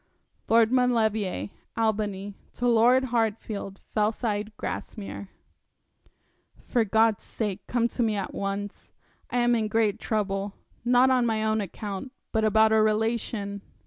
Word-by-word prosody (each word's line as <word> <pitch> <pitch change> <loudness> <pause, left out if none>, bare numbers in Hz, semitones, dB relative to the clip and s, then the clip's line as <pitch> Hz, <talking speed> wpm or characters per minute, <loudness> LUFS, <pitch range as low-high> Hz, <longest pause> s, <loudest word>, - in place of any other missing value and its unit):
'Lord 230 0 +5
Maulevrier, 220 -6 +1 0.3
Albany, 205 -3 -1 0.2
to 245 - 0
Lord 240 +3 +5
Hartfield, 215 -3 -2
Fellside, 210 0 0
Grasmere. 200 -2 -6 1.4
'For 240 -3 +2
God's 220 0 +2
sake 205 -3 -4
come 235 -1 +1
to 245 - -3
me 220 -2 +2
at 195 -2 -3
once. 200 +1 -4 0.4
I - - -1
am 240 0 +3
in 225 -2 +1
great 215 -1 +1
trouble; 200 -3 -1 0.3
not 250 +2 +5
on 250 -2 +3
my 220 -1 0
own 220 0 +1
account, 205 +4 -6 0.2
but 220 -1 +1
about 220 0 +4
a 220 0 +5
relation.' 215 -2 0
220 Hz, 130 wpm, -26 LUFS, 205-230 Hz, 1.4 s, Lord